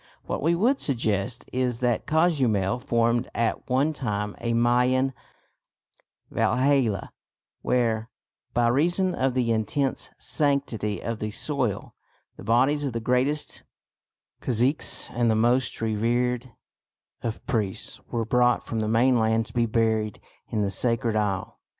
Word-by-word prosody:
What - - -3
we 165 +4 +2
would 245 +10 +2
suggest 115 -2 -1
is 125 -2 0
that 120 -3 0
Cozumel 130 - +2
formed 120 -1 +1
at 115 +2 -1
one 135 +5 +2
time 105 -7 -3
a 120 0 -1
Mayan 125 +3 +2 1.2
Valhalla 125 -4 +1 0.5
where, 115 -2 0 0.4
by 120 0 +2
reason 175 +8 +2
of 130 -1 0
the 120 -2 +1
intense 130 +5 -1
sanctity 140 -8 0
of 115 -1 -3
the 105 - -3
soil, 125 -2 -2 0.4
the - - -11
bodies 135 +6 +2
of 135 -4 -2
the 115 - -2
greatest 125 +6 0 0.8
caciques 125 +5 +2
and 120 -1 +1
the 110 - +3
most 120 +4 +2
revered 120 +3 0 0.7
of 115 -1 -5
priests 105 -5 -2
were 115 -1 -1
brought 125 +2 +2
from 115 - -3
the 110 - -1
mainland 115 -1 +3
to 110 - -12
be 120 -1 +1
buried 110 -2 0 0.3
in 110 -2 -1
the 100 - -1
sacred 115 +2 0
isle. 100 -3 -2
120 Hz, 130 wpm, -25 LUFS, 110-130 Hz, 1.2 s, the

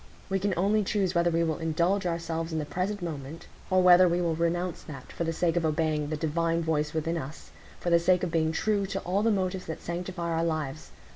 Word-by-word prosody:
We 195 - +2
can 195 -1 0
only 205 +4 +2
choose 195 -2 0
whether 170 -1 +3
we 165 0 +1
will 160 -1 -1
indulge 170 +4 +1
ourselves 165 -1 -3
in 160 - -2
the 150 - -2
present 185 +5 -3
moment, 155 -1 -6 0.2
or 185 -1 +3
whether 180 0 +7
we 175 +1 +1
will 170 -2 +1
renounce 170 +2 -1
that, 140 -4 -10
for - - -3
the 165 - 0
sake 165 0 0
of 175 - +1
obeying 155 -1 0
the 155 - -2
divine 165 +2 0
voice 150 -2 0
within 160 +2 -1
us,—for 155 +4 -8
the 170 - +6
sake 180 +1 +2
of 175 - -1
being 160 -1 +1
true 200 +3 0
to 195 0 -3
all 190 +3 0
the 225 - +3
motives 190 -3 -1
that 160 - -5
sanctify 175 0 -4
our 165 0 0
lives. 155 -2 -3
170 Hz, 225 wpm, -28 LUFS, 160-180 Hz, 0.2 s, whether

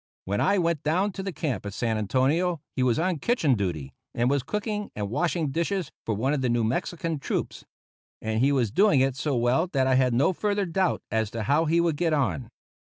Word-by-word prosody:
When 100 +2 -1
I 200 +1 +3
went 170 -4 +1
down 180 +7 +1
to 195 - -6
the 195 0 -3
camp 140 - -3
at 100 -1 -6
San 115 -2 0
Antonio 135 - +1 0.2
he 130 - -1
was 125 -2 +2
on 175 0 0
kitchen 165 - +2
duty, 85 - -3 0.2
and 120 +2 +2
was 140 -1 +2
cooking 210 - -3
and 105 -1 -4
washing 165 +2 0
dishes 170 +5 -1 0.2
for 110 - 0
one 130 +7 0
of 145 - -1
the 125 - +1
New 120 -1 +1
Mexican 160 +7 -2
troops; - - -3 0.5
and 110 0 -2
he 135 +4 +3
was 125 -7 +1
doing 195 - +4
it 135 -1 +1
so 145 0 -1
well 125 +8 +2
that 135 -6 +1
I 130 - +3
had 130 -2 +3
no 140 +9 +3
further 205 +1 0
doubt 185 +1 0
as 110 -1 0
to 115 0 -4
how 145 +9 +2
he 165 +2 +2
would 170 -3 +1
get 165 0 +1
on. 105 - 0
140 Hz, 220 wpm, -26 LUFS, 120-170 Hz, 0.5 s, doing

